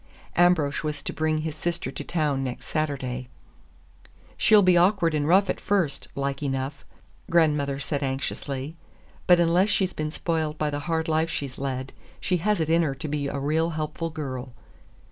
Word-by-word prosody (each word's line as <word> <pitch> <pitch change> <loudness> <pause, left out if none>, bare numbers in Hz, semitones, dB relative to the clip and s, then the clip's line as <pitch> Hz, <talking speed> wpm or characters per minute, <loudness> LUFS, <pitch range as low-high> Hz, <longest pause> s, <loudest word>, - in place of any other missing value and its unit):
Ambrosch 175 -5 +3
was 150 -2 -3
to - - -4
bring 155 0 0
his 160 -1 -3
sister 170 -3 -2
to - - -5
town 150 -5 0
next 125 -2 -5
Saturday. 130 -5 -2 1.1
"She'll 210 -2 +5
be 185 -1 +5
awkward 175 -1 +4
and 150 -1 0
rough 195 +4 +5
at - - -2
first, 185 -9 0
like 140 0 -2
enough," 135 0 -3 0.5
grandmother 150 -4 +2
said 145 0 -2
anxiously, 135 +1 -3 0.5
"but 180 -1 +7
unless 175 +4 +3
she's 190 -3 +1
been 155 0 -2
spoiled 160 -1 -2
by 150 -1 0
the 145 - -2
hard 160 0 0
life 160 +1 +1
she's 140 -4 -4
led, 130 -1 -3 0.3
she 180 - 0
has 205 +4 +1
it 160 - 0
in 165 +1 +4
her 145 -5 0
to 145 - -5
be 145 -1 -2
a 140 - -3
real 155 +4 +1
helpful 160 +2 -3
girl." 130 -5 -5
155 Hz, 175 wpm, -26 LUFS, 140-170 Hz, 1.1 s, but